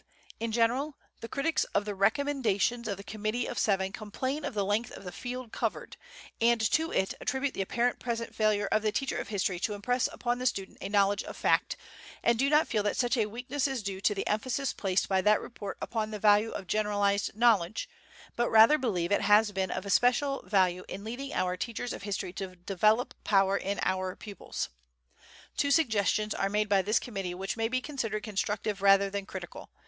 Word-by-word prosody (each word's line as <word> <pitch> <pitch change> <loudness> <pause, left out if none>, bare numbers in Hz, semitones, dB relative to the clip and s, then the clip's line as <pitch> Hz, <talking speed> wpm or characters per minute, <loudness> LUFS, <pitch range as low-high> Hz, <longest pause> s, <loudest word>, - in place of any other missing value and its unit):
In 230 0 -2
general, 245 +6 +1 0.2
the 230 - -7
critics 280 +6 0
of 205 - +2
the 210 - -3
recommendations 235 +1 +1
of 200 -3 -2
the 200 - -9
Committee 215 +3 -2
of 240 - -4
Seven 195 -2 +1
complain 260 +8 -4
of 285 -6 -4
the 200 -2 0
length 210 +4 0
of - - -10
the 180 - -6
field 250 +2 -6
covered, - - -3 0.5
and 235 0 +4
to 320 +1 +1
it 190 - 0
attribute 265 +1 -1
the - - -2
apparent 240 +5 0
present 230 -1 -3
failure 215 -2 +2
of 215 - +3
the 215 0 +1
teacher 270 +6 -1
of - - -5
history 195 -3 -1
to 210 +3 -1
impress 245 +5 0
upon 240 0 -2
the 255 - +1
student 195 -5 -3
a 195 - -4
knowledge 200 -1 +3
of - - -8
fact, - - +1 0.5
and 235 -1 +3
do 275 +2 +3
not 300 +1 +4
feel 215 - 0
that 205 0 -1
such 245 0 +2
a 220 -4 +1
weakness 250 +6 -2
is 265 -5 -3
due 195 -1 -4
to 210 - +2
the 195 - -2
emphasis 255 +5 -1
placed 190 -2 0
by 190 -1 +2
that 210 +2 +4
report 205 -4 -7
upon 220 -2 -2
the 215 - -4
value 210 +1 +4
of 195 - -6
generalized 205 0 0
knowledge, 220 - +3 0.5
but 240 0 +1
rather 225 +7 +7
believe 185 -9 -1
it 205 - +3
has 210 +1 +5
been 190 -1 -1
of 185 +2 -4
especial 250 +6 +2
value 185 -3 +2
in 200 - -7
leading 245 +5 -5
our 180 0 0
teachers 235 +4 -4
of - - -7
history 200 -3 -4
to 190 -1 -6
develop 215 +7 +1
power 195 -1 +3
in 200 0 -2
our 185 0 -1
pupils. 205 -2 -6 0.9
"Two 285 - +1
suggestions 215 - +2
are 195 - -1
made 210 +1 +1
by 200 -2 +3
this 210 +3 +2
committee 195 -6 -4
which 190 +2 -3
may 225 0 0
be 255 +2 0
considered 245 -7 -3
constructive 205 -1 -2
rather 195 0 +5
than 200 0 -4
critical. - - -8
215 Hz, 205 wpm, -29 LUFS, 200-240 Hz, 0.9 s, rather